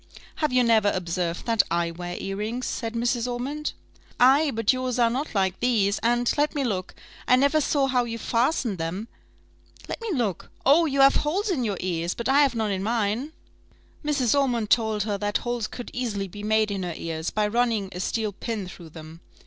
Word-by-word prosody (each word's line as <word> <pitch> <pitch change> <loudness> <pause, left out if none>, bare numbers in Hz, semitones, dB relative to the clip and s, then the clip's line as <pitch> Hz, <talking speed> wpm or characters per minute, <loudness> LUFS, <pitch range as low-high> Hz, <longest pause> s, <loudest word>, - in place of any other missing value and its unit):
"Have 305 -3 0
you 250 0 +4
never 220 -3 +4
observed 175 -2 -2
that 230 -3 +4
I 170 0 0
wear 175 +1 -6
earrings?" 210 +6 -3
said 230 -1 -3
Mrs. 240 +1 0
Ormond. 280 +5 -3 0.5
"Ay! 275 +5 +5
but 225 -2 +2
yours 255 -1 -2
are 235 -1 +3
not 265 +1 -3
like 190 -2 +1
these, 215 -5 +2
and 240 +1 +2
let 300 +2 +1
me 285 - 0
look 190 -7 -3 0.3
I 250 - +6
never 280 +4 +3
saw 285 -1 +2
how 250 -2 +1
you 230 -1 -4
fastened 230 - 0
them 180 +8 -4 0.8
let - - -5
me 460 - -4
look 235 - -2 0.2
oh! 320 +5 +5
you 275 -1 +1
have 275 0 +6
holes 385 +8 0
in 275 -9 0
your 205 -4 -1
ears; 175 -1 -2
but 235 - -3
I 275 +2 +5
have 275 -4 +3
none 220 -2 0
in 190 -1 -2
mine." 225 +5 -1 0.7
Mrs. 280 -6 +1
Ormond 245 -6 +1
told 220 -3 +2
her 205 -2 -2
that 205 0 0
holes 240 -3 -3
could 245 - -8
easily 210 -6 -2
be 205 +3 -9
made 215 0 +2
in 195 -1 -2
her 175 -3 -4
ears, 160 0 -3
by 215 -1 0
running 225 -2 0
a 180 - -7
steel 215 +2 -1
pin 210 -1 -4
through 175 -2 -11
them. 160 +1 -11
230 Hz, 200 wpm, -25 LUFS, 195-255 Hz, 0.8 s, I